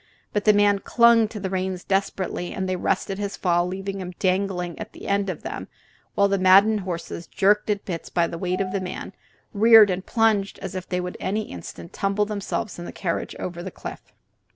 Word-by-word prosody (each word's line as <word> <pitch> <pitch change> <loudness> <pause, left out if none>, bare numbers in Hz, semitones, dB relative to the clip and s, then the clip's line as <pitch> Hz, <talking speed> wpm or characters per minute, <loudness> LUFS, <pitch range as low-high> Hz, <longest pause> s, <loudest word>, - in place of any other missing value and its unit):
But 205 - -1
the 210 - +7
man 205 -1 +4
clung 235 +1 +5
to 215 0 -8
the 190 -1 -4
reins 185 -1 -2
desperately, 195 -2 -2
and 190 -1 -3
they 185 - 0
arrested 195 +2 -1
his 200 -1 -3
fall, 175 -1 +2
leaving 195 +1 -4
him 180 0 -6
dangling 185 -2 -1
at - - -7
the - - -10
end 200 0 +1
of - - -5
them - - -5 0.5
while 200 - +4
the 195 -1 0
maddened 200 +4 +6
horses, 175 -2 -5
jerked 210 +2 +2
at 205 -1 -1
the 200 - -5
bits 165 - -5
by 170 -1 +2
the 165 0 -6
weight 185 +1 -1
of 185 -1 -2
the 195 0 -1
man, 180 - -6 0.4
reared 220 -1 +7
and 185 +1 -2
plunged 220 -3 +1
as - - -6
if 185 -1 -6
they 180 - 0
would 180 0 -5
in - - -4
any 210 +3 0
instant 85 -1 -9
tumble 200 +1 0
themselves 205 -2 -4
and 175 - -6
the - - -6
carriage 170 -3 -3
over 175 -1 -5
the 190 - -5
cliff. - - -8
195 Hz, 220 wpm, -24 LUFS, 180-205 Hz, 0.5 s, the